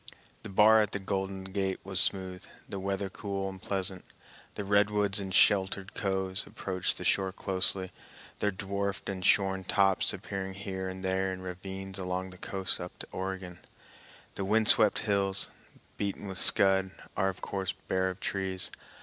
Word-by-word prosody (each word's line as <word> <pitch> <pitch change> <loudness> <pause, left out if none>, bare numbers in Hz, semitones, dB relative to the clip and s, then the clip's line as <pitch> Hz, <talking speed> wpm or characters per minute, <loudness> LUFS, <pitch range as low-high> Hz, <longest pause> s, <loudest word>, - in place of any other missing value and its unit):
The 110 - -8
bar 110 +3 +7
at 105 - -1
the - - 0
Golden 95 0 -2
Gate 95 0 -1
was 95 -2 -1
smooth, 95 -1 +1 0.2
the 100 - -5
weather 100 +1 -1
cool 95 0 -3
and 95 -1 -7
pleasant. 95 -1 -1 0.5
The 105 - -4
redwoods 105 0 +3
in 95 -1 -3
sheltered 95 0 +3
coves 95 -1 0
approach 95 -2 -2
the - - -6
shore 95 -1 +2
closely, 95 -1 0 0.5
their 105 - +2
dwarfed 100 0 -3
and 95 -2 -3
shorn 95 0 +3
tops 95 0 +3
appearing 95 -1 -5
here 95 -1 -4
and 95 0 -6
there 95 0 +1
in 95 0 -6
ravines 95 +1 -6
along 90 0 -2
the 90 - -13
coast 95 -1 -2
up 90 - -7
to - - -7
Oregon. 95 -2 -4 0.7
The 100 - -3
wind 110 +2 +3
swept 105 -2 +6
hills, 100 -2 +1 0.5
beaten 100 0 -3
with 95 -1 -3
scud, 95 -1 +4 0.3
are 95 -1 +2
of 95 - -7
course 95 -1 -2 0.2
bare 95 0 +1
of 95 +1 -6
trees. 95 -1 -2
95 Hz, 165 wpm, -30 LUFS, 95-100 Hz, 0.7 s, bar